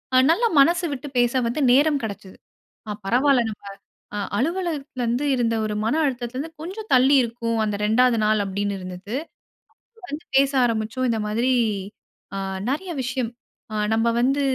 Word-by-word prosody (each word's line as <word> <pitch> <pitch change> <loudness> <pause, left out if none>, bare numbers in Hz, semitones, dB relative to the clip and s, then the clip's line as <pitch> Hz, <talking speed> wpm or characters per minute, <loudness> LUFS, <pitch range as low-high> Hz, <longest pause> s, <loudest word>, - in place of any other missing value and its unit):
அ - - +7
நல்ல 395 +9 +2
மனசு 340 +5 +4
விட்டு 280 +1 -6
பேச 240 -1 +3 0.2
வந்து 245 +6 -2
நேரம் 285 +2 +4
கிடச்சது. 200 -3 -7 0.5
ஆ - - -2
பரவால்ல 255 +5 +3
நம்ப 210 - -11 0.5
அ - - -2 0.2
அலுவலகத்தில 300 - -2
இருந்து 240 +5 0
இருந்த 235 -3 +1
ஒரு 210 - -3
மன 225 - +1
அழுத்தத்தில 250 -3 -3
இருந்து 310 +4 -4
கொஞ்சம் 390 +6 -6
தள்ளி 260 +3 +5
இருக்கும். 230 -1 -2
அந்த 210 -1 -1
2வது 240 +2 +3
நாள் 215 0 +3
அப்பிடின்னு 200 +1 -2
இருந்தது. 185 +4 -7 0.9
வந்து 295 +1 -6
பேச 275 0 +4
ஆரம்பிச்சோம். 230 +2 -1
இந்த 225 - -1
மாதிரி 230 +5 +1 0.8
அ - - -3 0.3
நிறைய 350 +6 -3
விஷயம். 245 -1 -2 0.4
ஆ - - -3 0.2
நம்ம 225 +1 +1
வந்து 270 +3 +2
245 Hz, 155 wpm, -23 LUFS, 220-280 Hz, 0.9 s, அ